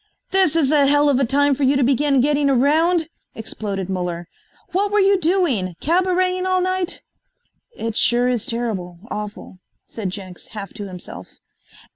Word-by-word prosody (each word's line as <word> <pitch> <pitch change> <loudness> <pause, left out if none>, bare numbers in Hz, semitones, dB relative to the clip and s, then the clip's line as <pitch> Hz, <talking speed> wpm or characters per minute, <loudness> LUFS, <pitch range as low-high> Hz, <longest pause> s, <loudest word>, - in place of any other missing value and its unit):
"This 375 -5 +3
is 300 -4 +2
a 290 -2 +4
hell 290 +1 +4
of 270 -2 +2
a 270 - +3
time 285 +3 +3
for 275 - -5
you 275 +1 +3
to 275 - +2
begin 275 +1 +3
getting 290 +1 +2
around," 315 +6 +3 0.3
exploded 200 -4 -4
Muller. 180 -2 -3 0.4
"What 400 +3 0
were 420 - +3
you 390 -1 +4
doing, 310 - +1
cabareting 365 +2 +1
all 370 0 +2
night?" 370 -1 -1 0.7
"It 225 -1 -4
sure 245 +1 +2
is 245 -4 -1
terrible 210 -7 -3
awful," 210 -3 -7 0.3
said 210 -5 -5
Jenks, 185 -1 -9
half 200 -3 -6
to 205 - -7
himself. 180 -2 -9
275 Hz, 160 wpm, -21 LUFS, 210-340 Hz, 0.7 s, a